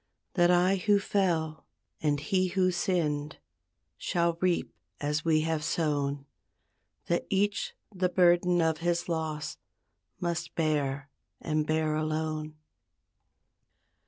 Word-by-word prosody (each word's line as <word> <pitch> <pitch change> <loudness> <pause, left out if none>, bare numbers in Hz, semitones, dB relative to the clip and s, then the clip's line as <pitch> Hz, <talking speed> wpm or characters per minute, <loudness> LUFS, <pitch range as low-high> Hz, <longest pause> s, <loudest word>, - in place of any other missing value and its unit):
That 175 -2 +4
I 180 +2 +4
who 205 +2 +3
fell, 170 -6 0 0.3
and 145 -2 +1
he 185 +5 +1
who 185 0 +2
sinned, 155 -5 -1 0.6
Shall 170 -1 +1
reap 180 -2 +1 0.3
as 150 +1 -1
we 160 -2 +3
have 160 -1 -1
sown; 145 -3 -1 0.8
That 170 - -1
each 200 +1 0 0.2
the 185 -1 +1
burden 175 -1 +4
of 160 -1 +1
his 170 0 0
loss 160 -3 -3 0.6
Must 175 -1 -3
bear 145 -3 0 0.3
and 155 -1 -1
bear 155 0 +1
alone. 155 0 -2
160 Hz, 110 wpm, -29 LUFS, 155-180 Hz, 0.8 s, That